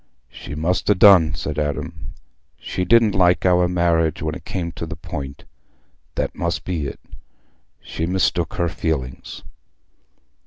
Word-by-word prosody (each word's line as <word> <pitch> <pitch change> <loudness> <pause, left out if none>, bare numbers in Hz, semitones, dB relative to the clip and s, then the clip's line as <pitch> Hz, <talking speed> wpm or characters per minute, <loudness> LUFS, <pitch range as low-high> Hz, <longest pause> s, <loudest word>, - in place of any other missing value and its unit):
"She 75 - -8
must 85 +4 -1
ha' 105 - +4
done," 90 -6 +7
said 75 +2 -4
Adam. 75 -1 -4 0.4
"She 90 - -3
didn't 115 -2 +4
like 90 -1 +3
our 90 -1 +4
marriage 85 -3 +1
when 75 0 -1
it - - -9
came 85 -3 -3
to - - -6
the - - -6
point—that 70 0 -8
must 85 0 -2
be 80 -6 -2
it. - - -8 0.8
She'd 80 +1 -4
mistook 90 -2 0
her 85 - 0
feelings." 75 -7 -4
85 Hz, 140 wpm, -21 LUFS, 75-90 Hz, 0.8 s, done